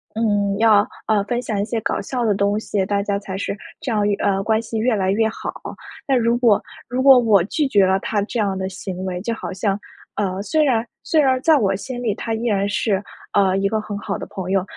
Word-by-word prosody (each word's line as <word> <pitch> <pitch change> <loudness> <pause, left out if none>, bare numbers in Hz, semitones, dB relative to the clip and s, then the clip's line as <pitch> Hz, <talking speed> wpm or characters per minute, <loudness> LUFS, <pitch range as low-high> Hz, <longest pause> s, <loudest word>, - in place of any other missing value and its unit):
嗯， 205 -3 +1
要， 215 -2 +5 0.2
呃， 210 -2 +2
分 240 +3 -2
享 220 -4 -3
一 - - -1
些 230 +1 -2
搞 - - -1
笑 245 +3 -2
的 210 -3 +2
东 200 +1 +1
西， 200 -3 -1
大 200 0 0
家 200 -1 -1
才 195 -1 -6
是 200 - -3 0.2
这 255 - -3
样， 210 -2 +1 0.2
呃， 195 -1 +1
关 220 +1 +1
系 230 0 -5
越 230 +2 +2
来 190 -2 0
越 220 +2 +2
好。 - - -6 0.5
但 270 -2 +3
如 235 +1 +2
果 230 -5 +4 0.3
如 250 +1 -1
果 270 -2 +8
我 220 -6 +4
拒 290 - 0
绝 200 -6 +4
了 190 +1 +3
他 210 -2 -1
这 230 +3 -4
样 200 -3 0
的 190 0 -2
行 190 -1 -6
为， 180 -1 -3
就 230 +4 -2
好 225 - -6
像， 195 +1 -1 0.4
呃， 195 -2 -2
虽 310 +6 +2
然 240 -5 +2 0.2
虽 320 - +2
然 260 -3 +3
在 320 0 +5
我 195 -7 +2
心 245 +5 -6
里 220 -4 +1
他 225 - -4
依 230 - -4
然 200 -3 +1
是， 200 -1 0 0.3
呃， 195 -2 +3
一 195 0 +1
个 220 +1 0
很 210 -1 -5
好 200 - -3
的 - - -6
朋 185 -1 -5
友。 195 -2 +2
210 Hz, 260 characters per minute, -21 LUFS, 195-230 Hz, 0.5 s, 果